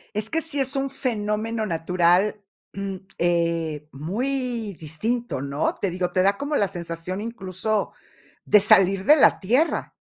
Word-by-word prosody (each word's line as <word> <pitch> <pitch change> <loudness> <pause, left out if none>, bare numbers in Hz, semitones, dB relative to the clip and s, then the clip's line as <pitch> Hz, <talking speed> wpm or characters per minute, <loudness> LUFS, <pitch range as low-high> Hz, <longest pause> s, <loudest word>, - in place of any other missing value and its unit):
Es 210 +1 -2
que 325 - 0
sí 310 -3 -3
es 270 +1 0
un 275 0 -1
fenómeno 220 -3 -2
natural, 180 +3 +1 0.3
mm, 195 -1 -4 0.2
eh, 165 -3 0
muy 230 - -2
distinto, 215 - -2
¿no?, 140 +2 -1
te 195 - -2
digo, 180 0 -2
te 185 - +2
da 200 +2 +2
como 290 +1 -2
la 200 - +2
sensación 175 +1 -5
incluso 210 -1 -3 0.5
de 210 - +6
salir 195 -1 +4
de 300 - +8
la - - +5
tierra. 250 - +1
200 Hz, 150 wpm, -24 LUFS, 175-235 Hz, 0.5 s, de